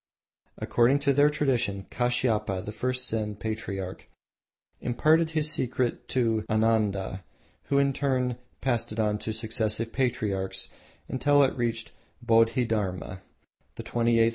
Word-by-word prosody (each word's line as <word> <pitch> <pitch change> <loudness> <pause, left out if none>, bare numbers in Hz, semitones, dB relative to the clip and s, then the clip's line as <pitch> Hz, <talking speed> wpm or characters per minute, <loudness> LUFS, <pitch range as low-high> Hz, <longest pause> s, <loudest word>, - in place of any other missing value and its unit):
According 120 +4 +3
to 140 -1 +3
their 145 +2 +5
tradition 120 -10 0
Kashiapa, 110 -6 0
the 105 - -4
first 125 +3 -1
Zen 105 -2 -1
patriarch, 100 -3 -5 0.7
imparted 155 +7 +3
the 160 -1 0
secret 125 -4 0
to 115 -4 +1
Ananda, 105 -4 +1 0.4
who 140 - +1
in 140 -1 +3
turn 130 -3 0 0.2
passed 120 -5 0
it 110 - -5
on 105 -1 +1
to 110 - -3
successive 110 0 -1
patriarchs 110 -7 -1 0.4
until 145 +2 +3
it 135 - +1
reached 115 -2 -2 0.3
Bodhi 115 0 +3
Dharma, 95 -4 -3 0.5
the - - -7
twenty 115 0 +1
eighth. 115 0 +5
115 Hz, 130 wpm, -27 LUFS, 105-130 Hz, 0.7 s, their